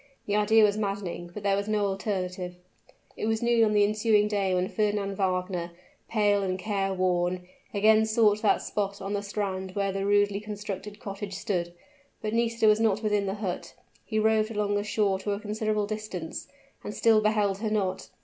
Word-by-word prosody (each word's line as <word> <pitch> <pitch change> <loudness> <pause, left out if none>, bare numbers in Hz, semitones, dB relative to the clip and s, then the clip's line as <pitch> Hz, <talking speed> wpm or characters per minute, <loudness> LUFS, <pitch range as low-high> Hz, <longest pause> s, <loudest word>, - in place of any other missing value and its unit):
The 205 - 0
idea 215 +1 +5
was 210 0 +3
maddening, 195 -4 -3
but 205 +3 -8
there 200 -1 +3
was 200 +1 -2
no 210 -1 +1
alternative. 185 -2 -3 0.6
It - - -3
was 225 +1 0
noon 235 -1 +4
on 210 - +1
the 205 -1 +5
ensuing 210 0 +3
day 200 -2 0
when 180 0 +1
Fernand 205 -1 -1
Wagner, 185 -2 -1 0.4
pale 205 -2 +2
and 185 -1 -1
care 195 0 -1
worn, 180 -1 0 0.2
again 220 +1 +4
sought 215 -1 +3
that 215 - +2
spot 200 -1 -2
on 195 +1 -4
the 205 - -1
strand 195 -2 -4
where 200 -1 0
the 195 0 -2
rudely 205 0 +2
constructed 210 -1 -6
cottage 200 -1 -6
stood; 185 -5 -2 0.5
but 215 0 -3
Nisida 230 -1 +1
was 215 0 +5
not 220 -1 +2
within 210 -2 +1
the 195 - -2
hut. 200 -4 -5 0.3
He 220 - -3
roved 215 0 +3
along 210 -2 -1
the 205 0 0
shore 205 -2 +1
to 205 +1 -2
a 200 - -3
considerable 215 0 -1
distance, 210 -6 -5 0.4
and 210 - -6
still 225 -2 +4
beheld 210 -2 +1
her 220 0 -1
not. 200 -3 -1
205 Hz, 190 wpm, -27 LUFS, 195-215 Hz, 0.6 s, idea